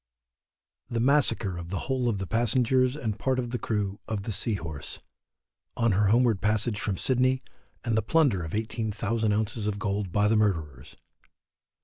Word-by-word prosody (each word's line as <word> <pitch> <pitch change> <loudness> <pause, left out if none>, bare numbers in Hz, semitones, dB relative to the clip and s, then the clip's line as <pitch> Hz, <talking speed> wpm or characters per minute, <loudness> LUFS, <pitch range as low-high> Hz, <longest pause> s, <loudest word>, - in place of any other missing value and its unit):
THE 115 - -1
MASSACRE 115 -8 +2
OF 85 0 -7
THE 95 0 -2
WHOLE 130 -2 0
OF 105 - -1
THE 95 - -3
PASSENGERS 125 +4 +2
AND 110 -7 -3
PART 130 -1 +1
OF 120 -2 -2
THE 125 - -2
CREW 100 -2 -2
OF 105 -3 -3
THE 110 - -3
SEA 110 +2 0
HORSE, 80 -7 -7 0.8
On 115 -1 +3
her 100 +2 +3
Homeward 115 -1 +3
Passage 105 +1 0
from 100 -3 -1
Sydney, 130 0 +2 0.4
and 115 -2 0
the 110 - +3
Plunder 135 - +2
of 80 - -5
18,000 110 0 -1
ounces 110 +1 -1
of 105 -1 -1
Gold 100 -2 -2
by 105 +3 +3
the 110 - +3
Murderers. 80 - -1
110 Hz, 170 wpm, -27 LUFS, 100-120 Hz, 0.8 s, On